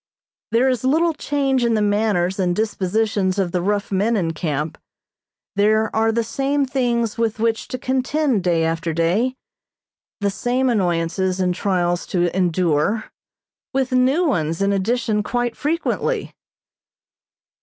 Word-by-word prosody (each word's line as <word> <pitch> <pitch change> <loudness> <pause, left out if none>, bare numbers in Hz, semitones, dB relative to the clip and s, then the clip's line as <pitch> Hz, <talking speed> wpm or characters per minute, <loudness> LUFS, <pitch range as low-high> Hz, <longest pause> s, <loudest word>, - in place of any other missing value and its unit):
There 240 +3 +3
is 255 -1 0
little 320 +6 +2
change 275 -4 0
in 235 -1 +2
the 215 - +1
manners 205 -3 +1
and 180 -2 +1
dispositions 205 -1 0
of 190 -3 0
the 180 - 0
rough 205 +2 -1
men 210 +4 +1
in 165 -4 -1
camp. 150 -1 -3 0.8
There 215 +2 +2
are 225 0 +3
the 230 +1 0
same 275 +5 0
things 240 -4 -1
with 225 -2 0
which 225 0 0
to 255 - -4
contend 260 - 0
day 170 -2 +2
after 165 0 -1
day, 195 +11 +1 0.8
the 200 -1 0
same 250 +4 0
annoyances 185 -1 0
and 180 -1 +1
trials 175 -2 0
to 175 -1 0
endure, 180 +2 +1 0.6
with 265 -1 +1
new 260 +7 +3
ones 165 - 0
in 200 0 +2
addition 215 +2 0
quite 240 +2 -2
frequently. 320 +4 -1
210 Hz, 140 wpm, -21 LUFS, 180-250 Hz, 0.8 s, There